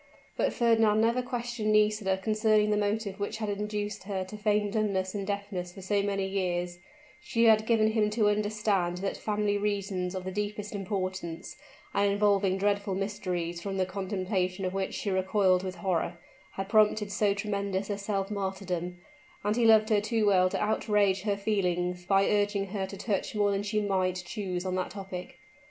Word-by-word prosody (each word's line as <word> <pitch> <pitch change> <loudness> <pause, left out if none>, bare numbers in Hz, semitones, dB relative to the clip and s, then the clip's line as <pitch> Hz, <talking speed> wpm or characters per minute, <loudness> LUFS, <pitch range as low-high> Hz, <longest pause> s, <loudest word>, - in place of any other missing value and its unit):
But - - +1
Fernand 225 -3 +3
never 230 +3 +3
questioned 240 -3 -2
Nisida 210 -2 +3
concerning 215 +1 +2
the - - +3
motive 205 -1 -1
which 205 +2 -3
had 215 -2 -3
induced 210 0 -3
her 195 -2 -2
to 190 +3 -9
feign 210 0 +1
dumbness 195 -4 0
and 200 -2 -4
deafness 200 -3 -3
for 195 +1 -11
so 200 +1 +1
many 200 -1 -1
years; 180 -2 -2 0.4
she 230 - 0
had 220 -1 +5
given 220 -2 +4
him 215 -1 +2
to 210 0 +2
understand 210 -4 +1
that 195 +2 -2
family 210 -1 0
reasons 195 -3 -2
of 185 - -4
the 190 - -4
deepest 210 +1 -4
importance, 185 -4 -4 0.4
and 200 0 +3
involving 200 -2 +2
dreadful 200 0 0
mysteries 180 -4 -3
from 195 +1 -4
the 185 - +2
contemplation 185 0 -2
of 185 - -2
which 195 0 -2
she 200 - -2
recoiled 190 -1 +2
with 185 -1 -5
horror, 175 -1 -1 0.4
had 195 0 -4
prompted 210 -1 +3
so 205 -1 +2
tremendous 200 -1 -2
a 200 - -2
self 200 -1 -2
martyrdom: 190 -3 -3 0.5
and 205 +1 +1
he 240 -1 +2
loved 220 0 +6
her 210 -1 +4
too 220 0 0
well 185 -2 +4
to - - -2
outrage 210 -2 +2
her 200 0 0
feelings 180 -3 -1
by 195 0 +4
urging 205 -1 +1
her 195 -1 -2
to 195 - -8
touch 205 0 -2
more 205 -1 +2
than 195 0 0
she 210 +1 -1
might 185 -3 0
choose 185 -2 -4
on 185 - -1
that 185 0 -1
topic. 190 -1 -7
200 Hz, 180 wpm, -29 LUFS, 190-210 Hz, 0.5 s, loved